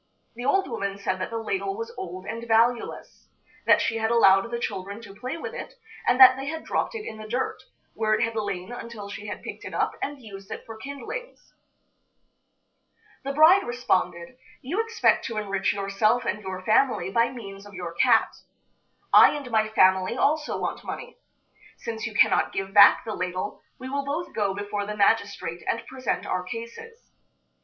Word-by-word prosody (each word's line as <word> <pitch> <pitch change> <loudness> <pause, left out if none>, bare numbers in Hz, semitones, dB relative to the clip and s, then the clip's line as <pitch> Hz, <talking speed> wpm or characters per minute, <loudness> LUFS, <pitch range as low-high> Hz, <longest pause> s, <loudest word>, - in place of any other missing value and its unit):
The 245 +2 -7
old 385 +8 +2
woman 200 0 -3
said 185 -2 -2
that - - -2
the 230 - -4
ladle 385 - -2
was 455 +1 -6
old 185 - -7
and 230 +1 -6
valueless; 230 +1 0 0.4
that - - +6
she 225 - 0
had 220 0 0
allowed 195 -2 +5
the 235 - -2
children 200 -2 -4
to 200 -3 -11
play 255 +9 -5
with 455 +7 -6
it, - - -8 0.3
and 250 +1 +3
that 260 0 +10
they 270 +1 -5
had 320 +2 -4
dropped - - -2
it 435 -1 -5
in 220 - -7
the 215 - -8
dirt, 250 +4 -2 0.3
where 215 -1 +1
it 215 - 0
had 230 0 -2
lain 200 -2 -3
until 230 -4 -8
she 210 +1 -7
had 205 - -6
picked - - -8
it - - -7
up - - 0
and 290 0 -4
used 195 -5 -11
it - - -7
for 225 -2 -9
kindlings. 280 - -8 1.7
The 275 - -2
bride 320 +7 +7
responded: 190 - -1 0.2
"You 345 - 0
expect 455 0 +2
to 230 - -4
enrich 200 -2 0
yourself 205 +5 +1
and 210 - -2
your 190 -2 -6
family 215 -5 +2
by 230 +3 +3
means 200 -5 -9
of 200 - -13
your 175 -2 -5
cat. 225 +6 +3 0.8
I - - +8
and 280 -4 -7
my 220 -1 +2
family 190 +1 +3
also 300 +3 +1
want - - -3
money. 485 +1 -7 0.6
Since 230 0 -5
you 220 - -8
cannot - - +3
give 195 0 -4
back 205 - +7
the 220 - -3
ladle, 185 +1 -4 0.2
we 255 - -8
will 280 +1 -2
both 290 +5 -4
go 200 -3 0
before 205 0 -3
the 210 0 -5
magistrate 200 -5 +1
and 230 - -1
present 260 -1 -3
our 185 - -1
cases. 235 - -9
225 Hz, 185 wpm, -25 LUFS, 200-260 Hz, 1.7 s, that